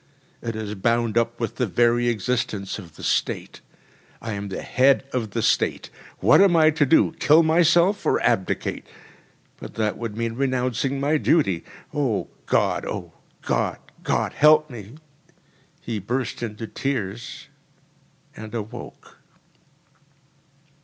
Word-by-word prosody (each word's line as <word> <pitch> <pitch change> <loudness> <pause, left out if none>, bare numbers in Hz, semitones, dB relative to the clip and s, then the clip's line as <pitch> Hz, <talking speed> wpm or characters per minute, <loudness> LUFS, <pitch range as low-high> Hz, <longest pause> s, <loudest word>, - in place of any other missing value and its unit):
It 115 -1 -4
is 110 -1 -4
bound 115 +2 0
up 115 0 0
with 115 - -3
the 125 - 0
very 120 +4 +2
existence 110 -3 -2
of 85 -5 -12
the - - -12
State. - - -2 0.6
I 115 - -6
am 100 0 -5
the 95 - -5
head 135 +1 +3
of 120 -4 -2
the 115 +2 -3
State! - - 0 0.3
What - - +6
am 195 -3 +5
I 155 -1 +5
to 150 -2 +1
do? 160 - +4
Kill 155 +3 +5
myself? 170 +4 +3
Or - - +2
abdicate? 95 - -1 0.7
But - - -10
that 110 -2 -1
would 115 -2 -5
mean 115 0 -2
renouncing 130 +1 -1
my 145 +3 +2
duty. 120 - +2 0.3
O 135 -8 -1 0.2
God, - - +1
O - - -6 0.3
God, - - 0 0.2
God, - - -1
help 150 0 +5
me!‚ÄĚ 115 +3 -10 0.8
He 115 -3 -4
burst 120 +3 -3
into 115 -1 -5
tears 120 -3 -4 0.9
and 110 +1 -8
awoke. 110 -1 -8
120 Hz, 135 wpm, -23 LUFS, 110-140 Hz, 0.9 s, What